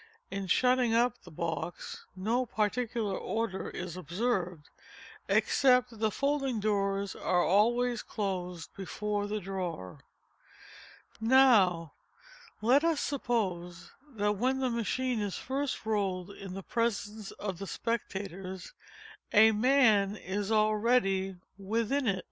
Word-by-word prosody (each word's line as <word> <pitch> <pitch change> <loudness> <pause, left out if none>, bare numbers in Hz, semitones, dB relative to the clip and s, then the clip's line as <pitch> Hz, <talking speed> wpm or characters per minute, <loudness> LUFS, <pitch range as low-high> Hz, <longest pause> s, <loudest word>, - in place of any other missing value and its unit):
In 195 -1 -3
shutting 250 +2 +3
up 240 +2 +2
the - - -13
box 165 0 -5
no 225 +7 0
particular 220 -1 -1
order 210 -1 -3
is 175 -1 -6
observed, 180 - -2 0.6
except 250 -2 +4
that 225 - -12
the 220 0 +2
folding 275 0 0
doors 200 -1 0
are 175 -1 +1
always 240 +4 +3
closed 180 -5 -4
before 205 +1 -3
the 210 +1 -2
drawer. 180 - -5 1.2
Now, 220 - +4 0.7
let 260 +6 +5
us 330 -3 +2
suppose 185 -10 -2 0.2
that 210 -1 +1
when 255 +5 +1
the 260 -2 0
machine 235 +1 -1
is 200 -2 -2
first 270 -2 -3
rolled 200 -3 -1
into 195 -2 -8
the 195 - -6
presence 215 -2 -2
of 190 -4 -5
the 195 - -5
spectators, 195 - -4 0.6
a 220 +1 +7
man 215 -4 +4
is 200 +1 -3
already 215 -3 +2 0.2
within 230 +7 0
it. 195 -3 +1
210 Hz, 120 wpm, -30 LUFS, 190-240 Hz, 1.2 s, a